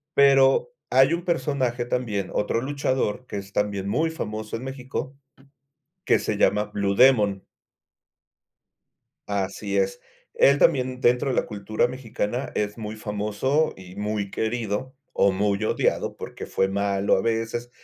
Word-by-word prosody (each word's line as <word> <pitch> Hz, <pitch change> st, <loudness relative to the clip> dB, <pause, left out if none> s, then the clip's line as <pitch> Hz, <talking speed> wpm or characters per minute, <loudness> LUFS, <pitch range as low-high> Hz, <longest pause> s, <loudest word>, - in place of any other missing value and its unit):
pero 135 Hz, -, +5 dB, 0.2 s
hay 135 Hz, +5 st, +5 dB
un 170 Hz, +1 st, -2 dB
personaje 130 Hz, -7 st, 0 dB
también, 110 Hz, -6 st, -2 dB
otro 105 Hz, +2 st, 0 dB
luchador, 130 Hz, -3 st, -1 dB
que -, -, -5 dB
es 100 Hz, 0 st, -8 dB
también 100 Hz, -2 st, -1 dB
muy 160 Hz, +9 st, +1 dB
famoso 110 Hz, -8 st, -5 dB
en 115 Hz, -, -9 dB
México, 130 Hz, +1 st, -5 dB, 0.9 s
que -, -, +4 dB
se 105 Hz, -, -2 dB
llama 105 Hz, +1 st, +3 dB
Blue 100 Hz, -1 st, -1 dB
Demon. 105 Hz, -6 st, +4 dB, 1.9 s
Así 100 Hz, 0 st, -2 dB
es. 95 Hz, +5 st, 0 dB, 0.3 s
Él 140 Hz, +1 st, +5 dB
también, 130 Hz, -5 st, +2 dB
dentro 125 Hz, +3 st, +3 dB
de 130 Hz, -, 0 dB
la -, -, +1 dB
cultura 105 Hz, +3 st, -1 dB
mexicana, 125 Hz, 0 st, -4 dB
es 105 Hz, +1 st, -2 dB
muy 110 Hz, 0 st, -5 dB
famoso 105 Hz, +9 st, -1 dB
y 95 Hz, 0 st, -12 dB
muy 105 Hz, -1 st, -3 dB
querido, 115 Hz, +3 st, -2 dB, 0.2 s
o 100 Hz, -, +3 dB
muy 100 Hz, +1 st, 0 dB
odiado, -, -, 0 dB
porque -, -, -7 dB
fue 95 Hz, -, +1 dB
malo 100 Hz, 0 st, +1 dB
a 95 Hz, -, +1 dB
veces. 115 Hz, +2 st, -2 dB
110 Hz, 140 wpm, -24 LUFS, 100-130 Hz, 1.9 s, pero